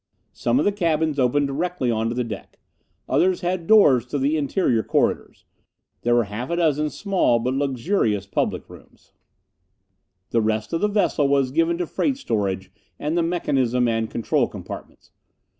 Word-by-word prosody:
Some 120 +1 0
of 145 - +2
the 205 - +3
cabins 160 -6 0
opened 135 +3 +2
directly 140 -2 -1
onto 115 +1 -1
the 125 - 0
deck. 110 -4 -8 0.5
Others 185 +1 +2
had 175 -2 -2
doors 145 - +6
to 145 - -3
the 140 +3 +1
interior 140 - +1
corridors. - - -1 0.6
There 120 0 +2
were 120 - +4
half 105 +4 -6
a 170 - 0
dozen 155 -3 +1
small 190 - +1
but 125 +3 -1
luxurious 135 - 0
public 100 - -2
rooms. - - -17 1.2
The 115 - +2
rest 110 +3 -1
of 165 - 0
the 210 - +3
vessel 200 -8 +1
was 140 -2 +2
given 165 +3 +1
to 175 - -1
freight 270 - -1
storage 100 - -2 0.3
and 150 +3 -2
the 175 - +2
mechanism 130 -8 +1
and 115 -1 -1
control 115 - 0
compartments. - - -10
140 Hz, 160 wpm, -23 LUFS, 120-170 Hz, 1.2 s, doors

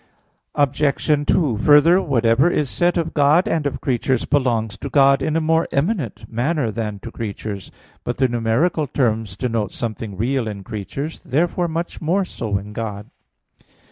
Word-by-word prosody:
Obj. 145 +1 +1
2: 140 - +2
Further, 150 - +6
whatever 130 0 +3
is 150 -6 -1
said 175 0 +1
of 165 -1 -1
God 150 +4 +4
and 155 -3 0
of 140 - -4
creatures, 130 0 0
belongs 115 -7 0
to - - -6
God 140 -1 +4
in 155 - -1
a - - +3
more 160 +1 +2
eminent 140 - -1
manner 125 +2 -1
than 105 -2 -4
to 115 - -8
creatures. 105 -3 -6 0.3
But 120 - -3
the 130 - +3
numeral 125 +7 0
terms 115 -7 -1
denote 115 -5 -1
something 110 -4 -5
real 125 +2 0
in 100 -2 -6
creatures; 115 - -6
therefore 175 +5 0
much 170 +1 -4
more 185 +5 +1
so 110 - -3
in 100 +2 -8
God. 105 -2 -5
130 Hz, 160 wpm, -21 LUFS, 110-155 Hz, 0.3 s, Further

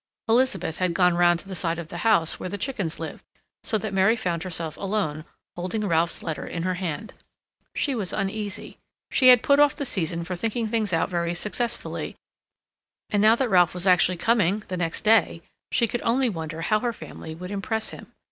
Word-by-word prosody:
Elizabeth 230 -8 +1
had 180 -2 0
gone 180 -1 +4
round 175 0 +4
to 195 - -4
the 195 - -6
side 170 -2 -1
of 170 -2 -7
the 175 - -6
house, 180 -6 +2
where 185 - -4
the 205 - -3
chickens 200 - -3
lived, - - -7 0.4
so 220 - 0
that 215 -1 -4
Mary 195 +4 +4
found 175 -7 -2
herself 165 -3 -4
alone, 190 -7 -2 0.3
holding 185 +5 -3
Ralph's 165 -1 0
letter 160 -2 -4
in 170 - -4
her 185 0 0
hand. 180 +3 -4 0.6
She 280 - 0
was 210 -7 -1
uneasy. 205 0 -4 0.3
She 260 - +4
had 250 -2 +8
put 280 0 +4
off 290 -1 +5
the 285 - -3
season 170 -7 -1
for 180 +2 -4
thinking 225 +4 -2
things 215 -3 -1
out 165 -1 +1
very 170 -1 -1
successfully, 215 +6 -3 1.0
and 205 - +2
now 220 +2 +6
that 255 0 -1
Ralph 180 -3 +4
was 180 +1 -2
actually 180 -1 +4
coming, 210 0 +2
the 185 - -2
next 165 -2 -2
day, 215 -6 +3 0.3
she 235 - +3
could 240 +2 -3
only 245 +2 +2
wonder 160 -4 -5
how 215 +5 +2
her 240 +1 -1
family 160 -6 -9
would 180 +3 -8
impress 220 +2 -2
him. - - -11
190 Hz, 200 wpm, -25 LUFS, 170-220 Hz, 1.0 s, had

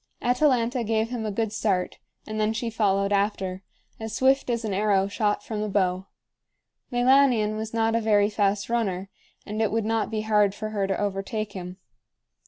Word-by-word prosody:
Atalanta 250 -1 +2
gave 220 0 0
him 230 -3 -3
a - - -2
good 220 +1 -2
start, 195 -5 -1 0.3
and 215 0 -5
then 215 +1 +1
she 230 +1 -3
followed 200 -2 +1
after, 195 -2 -1 0.4
as 220 0 -5
swift 265 +1 +2
as 235 -1 -1
an 210 - -2
arrow 195 -1 +2
shot 205 +1 -1
from 215 -2 -4
the 215 - -2
bow. 190 -1 0 0.8
Meilanion 245 -3 +3
was 220 0 -4
not 225 0 +1
a 230 - +1
very 205 -2 +3
fast 200 -1 0
runner, 195 -5 -2 0.3
and 215 +1 -3
it 220 - +1
would 225 0 0
not 225 0 0
be 215 -1 -2
hard 210 -2 +2
for 215 +1 -4
her 200 -2 -1
to 195 - -1
overtake 205 +1 -3
him. 180 -1 -7
215 Hz, 185 wpm, -25 LUFS, 200-225 Hz, 0.8 s, Meilanion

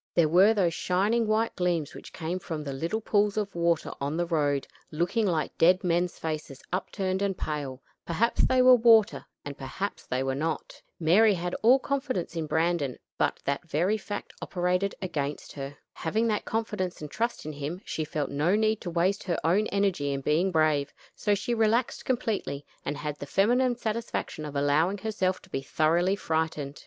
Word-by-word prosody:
There 170 -3 +5
were 185 +7 +6
those 180 -5 +2
shining 205 +7 +1
white 220 +1 +1
gleams 175 -5 0
which - - -11
came 175 +2 -3
from 160 -4 -5
the 140 -2 -4
little 165 +11 -2
pools 210 -1 +1
of 205 -2 -1
water 170 -1 +1
on 145 +3 -1
the 175 - +1
road, 145 -5 0 0.2
looking 175 +8 0
like 160 -4 -1
dead 180 +3 +5
men's 175 0 0
faces 155 -4 -5
upturned 190 0 -1
and 195 -2 0
pale; 140 -4 -4 0.2
perhaps 215 +8 +1
they 255 -1 +4
were 255 0 +9
water 225 -3 +5 0.2
and 145 0 -5
perhaps 140 +10 -5
they 130 +1 -1
were 135 0 -1
not. 155 +2 -3 0.2
Mary 195 +6 +5
had 175 0 -3
all 245 +4 +7
confidence 265 - -2
in 160 -2 -2
Brandon, 160 -5 0 0.2
but - - +1
that 140 +4 -2
very 180 +9 +2
fact 205 -1 -6
operated 180 +2 0
against 145 -5 -3
her. 140 0 -7 0.2
Having 215 +8 -1
that 210 - -1
confidence 210 -5 -2
and 150 -1 -7
trust 235 -4 -2
in 155 - -4
him, 145 +5 -5
she 160 - -2
felt 150 -1 -3
no 150 +7 +2
need 215 0 +1
to 175 - -4
waste 180 +4 +1
her 175 -3 0
own 195 +6 +3
energy 195 -8 0
in 135 0 -2
being 160 +7 +2
brave; 155 -3 +2 0.2
so 205 -1 +1
she 240 +4 -2
relaxed 230 +2 +1
completely, 215 - -2 0.2
and 145 +1 -3
had 150 0 -4
the 145 - -6
feminine 245 - +3
satisfaction 225 -8 -3
of 145 -1 -7
allowing 150 +7 +2
herself 190 -3 -1
to 190 - -17
be 135 - -2
thoroughly 170 +7 +2
frightened. 160 -5 -2
175 Hz, 185 wpm, -28 LUFS, 150-210 Hz, 0.2 s, were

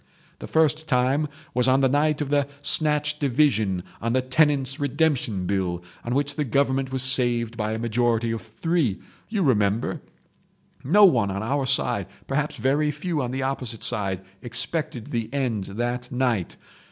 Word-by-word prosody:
"The - - -7
first 160 0 +1
time 135 +3 +2 0.3
was 125 0 +1
on 130 +1 +4
the 135 - +4
night 150 +3 +1
of 145 -1 -3
the 145 -1 +2 0.2
snatch 150 -1 +2
division 115 - +1 0.2
on 115 +1 -1
the 130 - +2
Tenants' 135 0 +1
Redemption 140 - 0
Bill, 90 -2 -1 0.2
on 120 +1 -2
which 145 +2 0
the 150 - +1
Government 135 0 0
was 130 -1 0
saved 120 -3 +4
by 110 -1 -2
a - - -2
majority 115 0 0
of 115 - -3
three. 135 - -1 0.3
You 215 -4 0
remember? 105 -5 +1 0.8
No 200 +10 +6
one 120 - +3
on 100 +2 -3
our 135 +3 -1
side—perhaps 135 - -1
very 145 +3 +1
few 150 +1 -2
on 125 - -2
the 130 +1 -3
opposite 125 -4 -3
side—expected 110 - -3
the 115 -2 -3
end 125 -8 -1
that 120 +4 -4
night. 125 -7 -1
130 Hz, 155 wpm, -24 LUFS, 115-145 Hz, 0.8 s, No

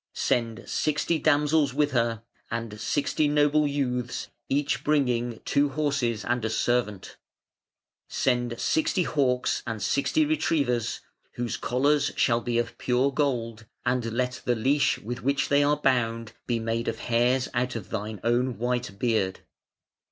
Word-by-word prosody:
Send 115 -1 -1
sixty 155 +2 0
damsels 145 -2 +2
with 145 0 +2
her, 115 -2 0 0.3
and 115 -2 -5
sixty 145 +1 +1
noble 150 0 +3
youths 125 -4 -2 0.2
each 140 +1 0
bringing 125 -6 +1
two 145 0 +2
horses 140 -6 -1
and 120 -1 0
a 110 - 0
servant. 110 -4 -1 0.9
Send 120 -2 0
sixty 160 +6 +1
hawks 130 -6 +1
and 115 -2 -3
sixty 140 - +1
retrievers, 140 - 0 0.3
whose 120 -3 -3
collars 140 +4 +1
shall 120 -2 +2
be 120 0 -1
of 120 0 -2
pure 130 +2 +2
gold, 115 -6 -1 0.2
and 120 -2 0
let 125 +1 -2
the 120 - +1
leash 135 +5 +2
with 120 +3 -6
which 140 +1 0
they 145 0 +4
are 145 +1 +2
bound 115 -5 0 0.2
be 120 - +1
made 115 +1 -2
of 115 - -1
hairs 125 +3 +1
out 125 0 -1
of 110 -5 -7
thine 105 -1 -4
own 120 0 +1
white 120 -3 -2
beard. 110 -5 0
125 Hz, 145 wpm, -26 LUFS, 115-140 Hz, 0.9 s, they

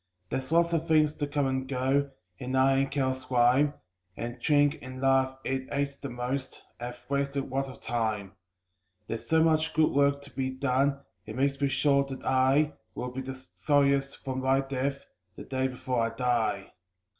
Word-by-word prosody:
There's 130 +2 -3
lots 170 0 +3
of 165 0 0
things 155 -2 +4
to 145 - -1
come 145 -1 0
and 130 0 -1
go, 135 +2 +1 0.3
and 130 +1 -2
I, 135 +1 +4
in 135 0 +2
careless 130 -2 -2
rhyme, 130 +4 +4 0.4
And 120 +1 -5
drink 145 +2 +3
and 130 0 -8
love 135 0 +2
(it 130 0 -2
wastes 140 0 -2
the 140 - -5
most) 125 +2 -4 0.2
have 120 +1 -6
wasted 140 -1 -1
lots 135 +1 -1
of 130 - -12
time. 110 -4 -2 0.7
There's 115 - -5
so 160 -1 +5
much 160 -1 +2
good 155 0 +4
work 140 0 +2
to 140 - -14
be 130 -1 -2
done 135 +1 +1 0.3
it 110 - -6
makes 135 +1 0
me 140 - +3
sure 140 0 +3
that 135 -1 -8
I 135 +3 +3 0.2
Will 125 - -4
be 130 +1 -4
the 130 0 -6
sorriest 140 +1 +1
for 130 -1 -2
my 130 +1 +2
death, 135 +1 -3 0.3
the - - -8
day 130 0 -1
before 125 -2 -1
I - - -3
die. 115 -5 0
135 Hz, 180 wpm, -28 LUFS, 130-140 Hz, 0.7 s, so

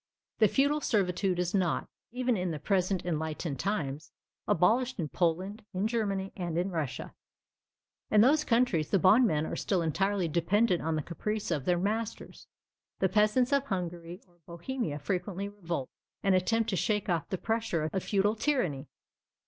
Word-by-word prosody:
The 215 - +6
feudal 285 +7 +2
servitude 190 -5 +1
is 180 0 -1
not, 185 -5 +1 0.2
even 250 0 0
in 180 -2 -1
the 160 - -3
present 185 +2 0
enlightened 160 -3 -3
times, 150 -7 -2 0.4
abolished 235 +8 +2
in 155 -3 -2
Poland, 185 +7 -1
in 195 +3 +1
Germany, 200 -4 -1
and 175 -3 -3
in 180 +3 0
Russia. 155 -6 -4 1.0
In 210 - +5
those 295 +6 +5
countries, 230 - +2
the 195 - +3
bondmen 185 -4 +4
are - - -4
still 185 -4 0
entirely 190 +3 0
dependent 180 +4 +2
on 160 0 -1
the 155 - -2
caprice 210 +6 -3
of 145 -5 -1
their 180 -1 +2
masters. 215 +4 -3 0.5
The 190 - +1
peasants 215 +6 +3
of 280 0 +2
Hungary 175 -2 -4
or 175 -1 -29
Bohemia 170 - -4
frequently 185 +5 -3
revolt, 170 -9 -4 0.4
and 195 -2 +3
attempt 225 +5 +1
to - - 0
shake 210 +2 0
off 170 -3 -1
the 190 - -2
pressure 220 -8 -1
of 190 - -1
feudal 205 +1 +2
tyranny. 215 - -1
190 Hz, 160 wpm, -30 LUFS, 170-215 Hz, 1.0 s, The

